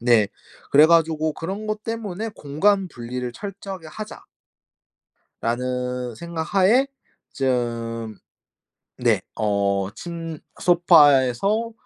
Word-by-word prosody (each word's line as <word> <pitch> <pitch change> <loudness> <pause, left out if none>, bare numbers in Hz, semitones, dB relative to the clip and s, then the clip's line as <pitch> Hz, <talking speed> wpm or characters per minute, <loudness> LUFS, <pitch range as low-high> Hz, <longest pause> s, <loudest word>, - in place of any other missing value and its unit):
네. 115 -4 +4 0.4
그래 150 +2 +8
가지고 160 -1 +3
그런 190 +8 -5
것 215 0 -3
때문에 225 -2 -4
'공간 190 +7 +1
분리를 125 -2 -5
철저하게 195 - -7
하자.' 215 +6 -8 1.2
라는 125 0 -2
생각 170 +6 -5
하에 210 +8 +5 0.5
좀 115 -4 -2 0.8
네 - - +2 0.2
어 100 -2 0
침 165 +2 -6 0.2
'소파에서 175 - +4
155 Hz, 185 characters per minute, -23 LUFS, 120-190 Hz, 1.2 s, 그래